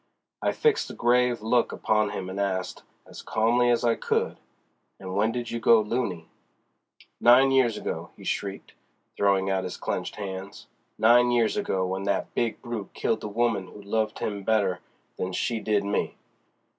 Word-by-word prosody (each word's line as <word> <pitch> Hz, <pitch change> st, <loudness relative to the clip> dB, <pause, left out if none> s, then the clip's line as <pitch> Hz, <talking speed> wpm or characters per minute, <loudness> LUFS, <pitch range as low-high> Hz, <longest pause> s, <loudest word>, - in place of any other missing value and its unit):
I -, -, +1 dB
fixed 455 Hz, -1 st, +1 dB
a -, -, -8 dB
grave 120 Hz, -1 st, +2 dB
look 120 Hz, +2 st, +2 dB
upon 110 Hz, -1 st, +1 dB
him 95 Hz, -2 st, -5 dB
and 95 Hz, -, -5 dB
asked, 95 Hz, -2 st, -2 dB, 0.2 s
as -, -, -11 dB
calmly 120 Hz, +3 st, +2 dB
as 120 Hz, 0 st, +2 dB
I 120 Hz, -1 st, +4 dB
could: -, -, -1 dB, 0.6 s
"And 95 Hz, -1 st, -7 dB
when 110 Hz, +3 st, +2 dB
did 120 Hz, 0 st, -4 dB
you 115 Hz, -, -2 dB
go 115 Hz, 0 st, +6 dB
luny?" 105 Hz, -7 st, -2 dB, 0.9 s
"Nine 130 Hz, +3 st, +6 dB
years 130 Hz, -4 st, +3 dB
ago!" -, -, -4 dB
he -, -, -13 dB
shrieked, 100 Hz, -1 st, -4 dB, 0.4 s
throwing 95 Hz, -1 st, +2 dB
out 95 Hz, -1 st, 0 dB
his 90 Hz, -, -5 dB
clenched -, -, -3 dB
hands—"nine 105 Hz, +4 st, 0 dB
years 120 Hz, -2 st, +2 dB
ago, 95 Hz, -, -1 dB
w'en 95 Hz, +1 st, -3 dB
that 100 Hz, -, -1 dB
big 115 Hz, -2 st, -1 dB
brute 120 Hz, -5 st, -6 dB
killed 110 Hz, -, 0 dB
the -, -, -4 dB
woman 105 Hz, -3 st, 0 dB
who 105 Hz, -, -13 dB
loved 110 Hz, +1 st, -1 dB
him 100 Hz, -1 st, -3 dB
better 100 Hz, -3 st, +1 dB, 0.4 s
than 90 Hz, 0 st, -3 dB
she 115 Hz, +4 st, -1 dB
did 105 Hz, -2 st, +1 dB
me! 100 Hz, +1 st, -1 dB
110 Hz, 170 wpm, -26 LUFS, 100-120 Hz, 0.9 s, go